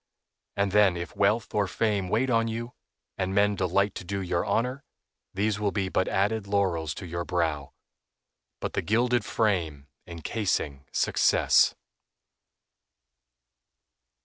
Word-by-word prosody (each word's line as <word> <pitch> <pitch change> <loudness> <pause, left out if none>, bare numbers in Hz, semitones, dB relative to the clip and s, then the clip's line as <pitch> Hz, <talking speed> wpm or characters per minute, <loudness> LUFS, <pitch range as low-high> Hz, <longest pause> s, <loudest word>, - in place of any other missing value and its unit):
And 100 -1 +1
then 100 -3 +4
if 85 - -6
wealth 105 +3 +1
or 105 -2 +1
fame 100 -1 -1
wait 125 +6 +1
on 115 -1 +2
you, 115 +2 -5 0.5
and 95 +1 -1
men 105 +1 +4
delight 100 +1 +1
to - - -10
do 100 +2 -3
you 90 -2 -1
honor, 125 +4 -1 0.5
these 105 +2 -1
will 105 -1 +1
be 95 -2 -1
but 95 - 0
added 105 +1 0
laurels 95 -6 0
to 95 - -7
your 85 0 -4
brow, 80 -5 -2 0.9
but - - -4
the - - 0
gilded 120 +6 +1
frame 80 -10 -1 0.2
encasing 85 -5 -3
success. - - +3
100 Hz, 130 wpm, -27 LUFS, 90-110 Hz, 0.9 s, then